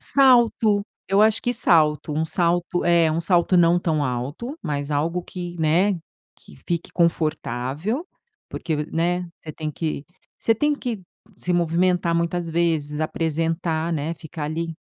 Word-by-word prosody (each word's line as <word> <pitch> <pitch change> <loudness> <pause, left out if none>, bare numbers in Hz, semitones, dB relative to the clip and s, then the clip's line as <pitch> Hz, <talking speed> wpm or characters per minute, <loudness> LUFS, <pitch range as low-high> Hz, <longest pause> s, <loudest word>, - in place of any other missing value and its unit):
Salto, 235 -6 +4 0.3
eu 195 +2 +4
acho 220 0 +3
que 245 - 0
salto. 155 -8 +3
Um 155 +2 0
salto 175 +1 0
É, 170 -2 +4
um 160 +2 0
salto 175 +1 +2
não 175 0 +5
tão 155 -4 0
alto, 140 - -4
mas 145 0 -3
algo 165 +5 0
que, 175 -1 -7
né, 170 +6 +3 0.4
que 70 - -17
fique 170 -1 -2
confortável, 160 - -1 0.4
porque, 160 - -3 0.2
né, 175 +2 0 0.2
você 155 - -8
tem 155 0 -4
que 150 -1 -4 0.3
você 225 - +2
tem 295 +6 +1
que 240 -8 -5 0.3
se 180 - -2
movimentar 175 0 +1
muitas 170 0 -1
vezes, 160 -3 0
apresentar, 165 +1 -1
né, 155 +1 -2
ficar 160 -1 -7
ali. 165 +2 -3
170 Hz, 145 wpm, -23 LUFS, 155-180 Hz, 0.4 s, não